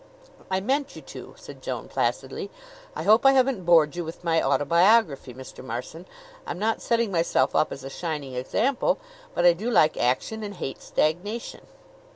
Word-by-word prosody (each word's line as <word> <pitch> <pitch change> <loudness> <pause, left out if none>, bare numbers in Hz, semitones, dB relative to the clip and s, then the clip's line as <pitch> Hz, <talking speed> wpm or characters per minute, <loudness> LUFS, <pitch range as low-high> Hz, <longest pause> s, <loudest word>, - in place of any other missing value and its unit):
"I 190 0 0
meant 275 +6 -1
you - - -10
to," - - -11
said - - -12
Joan - - -5
placidly. 420 -3 -2 0.5
"I - - -4
hope 220 +2 +5
I 270 0 +7
haven't 260 -8 +2
bored 165 -2 +5
you 175 - -3
with 165 +2 -9
my 165 -1 +2
autobiography, 155 - +3
Mr. 130 +1 -11
Marson. 130 +9 -7 0.4
I'm - - -4
not 220 +4 -1
setting 235 -3 0
myself 170 -2 +1
up - - +2
as 135 - -7
a 135 - -6
shining 150 -5 -4
example; 255 - 0 0.4
but 175 - +1
I 175 - +8
do 210 +8 -4
like 155 -10 +3
action 130 - 0
and 205 -1 -6
hate 135 - -6
stagnation." 190 +9 -2
175 Hz, 175 wpm, -25 LUFS, 150-225 Hz, 0.5 s, I